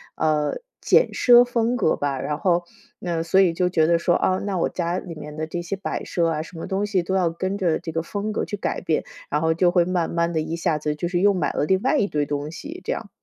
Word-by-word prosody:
呃， 155 Hz, -, 0 dB, 0.2 s
简 485 Hz, -, +4 dB
奢 245 Hz, 0 st, +7 dB
风 240 Hz, 0 st, 0 dB
格 160 Hz, -, +2 dB
吧。 140 Hz, -2 st, -2 dB
然 150 Hz, +3 st, -2 dB
后 175 Hz, -2 st, +1 dB, 0.4 s
嗯， 170 Hz, -2 st, -2 dB
所 170 Hz, +3 st, +3 dB
以 180 Hz, -3 st, +3 dB
就 180 Hz, +1 st, +1 dB
觉 160 Hz, -3 st, +3 dB
得 170 Hz, -, +4 dB
说： 175 Hz, +1 st, +2 dB
“啊， 185 Hz, -, +2 dB
那 200 Hz, -2 st, -2 dB
我 170 Hz, -, +1 dB
家 175 Hz, 0 st, -2 dB
里 175 Hz, -, -8 dB
面 150 Hz, 0 st, -9 dB
的 155 Hz, +1 st, -3 dB
这 175 Hz, +2 st, -4 dB
些 175 Hz, +3 st, -3 dB
摆 190 Hz, -, -4 dB
设 170 Hz, -2 st, 0 dB
啊， 155 Hz, -1 st, -1 dB
什 165 Hz, +2 st, -10 dB
么 165 Hz, -, -6 dB
东 195 Hz, +2 st, -1 dB
西 200 Hz, -3 st, +1 dB
都 190 Hz, +2 st, -2 dB
要 180 Hz, -3 st, +2 dB
跟 185 Hz, +4 st, -3 dB
着 175 Hz, -5 st, +1 dB
这 165 Hz, -1 st, -6 dB
个 165 Hz, +1 st, -1 dB
风 205 Hz, +4 st, -3 dB
格 -, -, -2 dB
去 205 Hz, -, -4 dB
改 -, -, -2 dB
变。” 160 Hz, -3 st, 0 dB, 0.3 s
然 150 Hz, -, 0 dB
后 160 Hz, 0 st, +2 dB
就 175 Hz, +1 st, +3 dB
会 175 Hz, -1 st, +4 dB
慢 175 Hz, -2 st, 0 dB
慢 170 Hz, 0 st, 0 dB
地 160 Hz, -, +1 dB
一 160 Hz, +2 st, -3 dB
下 170 Hz, -2 st, 0 dB
子 150 Hz, 0 st, -2 dB
就 160 Hz, +3 st, -3 dB
是 175 Hz, 0 st, 0 dB
又 200 Hz, +2 st, +4 dB
买 180 Hz, -5 st, 0 dB
了 -, -, 0 dB
另 190 Hz, +2 st, +2 dB
外 265 Hz, +4 st, +2 dB
一 205 Hz, -, +2 dB
堆 150 Hz, -6 st, -1 dB
东 145 Hz, +1 st, -3 dB
西， 310 Hz, -, -8 dB
这 -, -, -1 dB
样。 -, -, -7 dB
175 Hz, 295 characters per minute, -23 LUFS, 160-190 Hz, 0.4 s, 奢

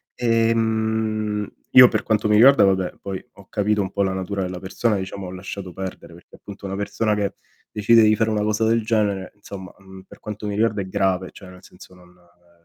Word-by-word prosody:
Ehm, 110 Hz, -2 st, 0 dB, 0.2 s
io 125 Hz, -1 st, +9 dB
per -, -, -1 dB
quanto 110 Hz, -1 st, 0 dB
mi 105 Hz, -, +3 dB
riguarda, 130 Hz, 0 st, +7 dB
vabbè, 95 Hz, -2 st, 0 dB
poi 95 Hz, -1 st, -6 dB
ho 100 Hz, -2 st, -16 dB
capito 105 Hz, 0 st, 0 dB
un 95 Hz, -, -4 dB
po' 100 Hz, -, +1 dB
la 95 Hz, -, 0 dB
natura 95 Hz, +1 st, -3 dB
della 90 Hz, -1 st, -4 dB
persona, 105 Hz, +3 st, -1 dB
diciamo 95 Hz, 0 st, -6 dB
ho 90 Hz, -, -7 dB
lasciato 95 Hz, 0 st, -7 dB
perdere 95 Hz, -2 st, -8 dB
perché 85 Hz, -, -17 dB
appunto 100 Hz, 0 st, -11 dB
una 95 Hz, -, -4 dB
persona 105 Hz, +1 st, -1 dB
che 100 Hz, -1 st, -2 dB, 0.4 s
decide 115 Hz, +2 st, +4 dB
di 110 Hz, -, +5 dB
fare 110 Hz, -1 st, +1 dB
una 105 Hz, -1 st, 0 dB
cosa 105 Hz, +1 st, 0 dB
del 115 Hz, 0 st, +2 dB
genere 105 Hz, -4 st, -1 dB
insomma, 95 Hz, -2 st, -10 dB
mhmm, 95 Hz, 0 st, -14 dB
per -, -, -17 dB
quanto 105 Hz, 0 st, -7 dB
mi 100 Hz, -, -3 dB
riguarda 110 Hz, -1 st, +1 dB
è 95 Hz, -, -6 dB
grave, 95 Hz, -2 st, 0 dB
cioè, 95 Hz, -, -13 dB
nel 90 Hz, 0 st, -15 dB
senso 90 Hz, 0 st, -16 dB
non 90 Hz, -1 st, -19 dB
ehm, 90 Hz, 0 st, -27 dB
100 Hz, 215 wpm, -22 LUFS, 95-110 Hz, 0.4 s, io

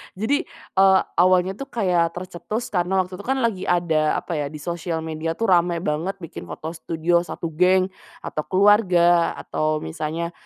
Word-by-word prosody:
Jadi, 280 Hz, -, 0 dB, 0.3 s
eee, 190 Hz, 0 st, +6 dB, 0.2 s
awalnya 185 Hz, +1 st, +4 dB
tuh 275 Hz, -, -5 dB
kayak 180 Hz, -9 st, 0 dB
tercetus 185 Hz, +6 st, -5 dB
karena 185 Hz, 0 st, +1 dB
waktu 185 Hz, +1 st, -10 dB
itu -, -, -9 dB
kan 265 Hz, -, +2 dB
lagi, 220 Hz, -5 st, -1 dB
ada 160 Hz, -3 st, +2 dB
apa -, -, -4 dB
ya, 145 Hz, -, -1 dB
di 155 Hz, -, -10 dB
sosial 170 Hz, -1 st, -3 dB
media 160 Hz, +1 st, -3 dB
tuh 230 Hz, 0 st, 0 dB
rame 175 Hz, -1 st, +2 dB
banget 165 Hz, +6 st, -1 dB
bikin 165 Hz, -, -8 dB
foto 160 Hz, -, -6 dB
studio 165 Hz, +1 st, 0 dB
satu 170 Hz, -1 st, -5 dB
geng, 185 Hz, +3 st, +3 dB, 0.3 s
atau 155 Hz, -, -3 dB
keluarga 185 Hz, -4 st, +4 dB
atau 155 Hz, 0 st, -2 dB
misalnya, 155 Hz, -, -4 dB
175 Hz, 165 wpm, -22 LUFS, 165-190 Hz, 0.3 s, eee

